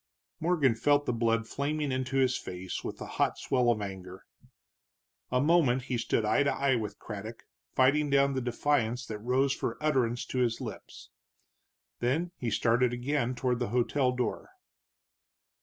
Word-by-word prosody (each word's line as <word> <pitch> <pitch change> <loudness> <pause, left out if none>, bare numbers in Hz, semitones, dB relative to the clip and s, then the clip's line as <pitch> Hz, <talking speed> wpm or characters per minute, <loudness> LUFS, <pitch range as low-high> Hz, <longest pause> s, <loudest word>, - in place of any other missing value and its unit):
Morgan 160 -7 +2
felt 145 +5 +2
the - - 0
blood 115 -1 +1
flaming 145 +2 -2
into 130 +1 -1
his 130 -1 +3
face 90 0 -5
with - - -5
the - - -7
hot - - 0
swell 125 -2 +1
of 110 -3 +1
anger. 95 -1 -8 1.1
A 125 - +2
moment 140 -4 +3
he 125 -1 -2
stood 115 -1 0
eye 110 +6 +3
to 140 - +2
eye 140 -1 +1
with 105 -3 -4
Craddock, 110 +1 -8 0.3
fighting 145 +3 +3
down 140 0 +3
the 130 - -1
defiance 125 0 0
that 110 -3 -6
rose 130 +4 +1
for 115 - -3
utterance 130 -6 +1
to 130 - -3
his 120 -2 +1
lips. - - -9 0.9
Then 150 +9 0
he 120 - -1
started 120 +3 +2
again 125 0 -1
toward 125 -1 0
the 120 - -1
hotel 125 +3 +1
door. 125 -2 -3
125 Hz, 160 wpm, -29 LUFS, 115-140 Hz, 1.1 s, his